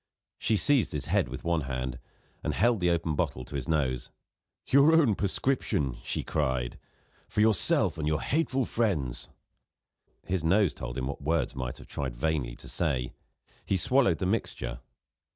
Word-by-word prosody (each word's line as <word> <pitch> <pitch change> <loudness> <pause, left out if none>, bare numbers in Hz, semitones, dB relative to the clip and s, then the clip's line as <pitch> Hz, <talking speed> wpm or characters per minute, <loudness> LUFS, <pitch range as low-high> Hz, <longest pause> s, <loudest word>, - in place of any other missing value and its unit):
She 110 - +2
seized 140 +1 +3
his 70 -3 -3
head - - +1
with 65 - -7
one 85 -1 +1
hand, 65 -2 -4 0.4
and - - -1
held 120 -2 +3
the 90 -1 +2
open 85 -2 0
bottle 65 -3 -2
to - - -13
his 70 - -3
nose. 65 -6 0 0.6
"Your 140 +4 +5
own 150 -9 +5
prescription," 95 - 0
she - - -3
cried, 65 -5 -1 0.5
"for - - -3
yourself 105 -6 +3
and 75 - -1
your 75 0 +1
hateful 135 -4 +1
friends." 85 - -1 1.0
His 90 -3 -1
nose 95 0 +3
told - - -6
him 65 - -1
what 70 +2 -5
words 80 0 0
might 65 -2 -4
have - - -12
tried 65 -4 -4
vainly 70 -3 -1
to - - -13
say: 60 -2 -1 0.5
he 95 - 0
swallowed 120 -3 +3
the - - -2
mixture. 105 +5 -2
80 Hz, 165 wpm, -29 LUFS, 65-105 Hz, 1.0 s, Your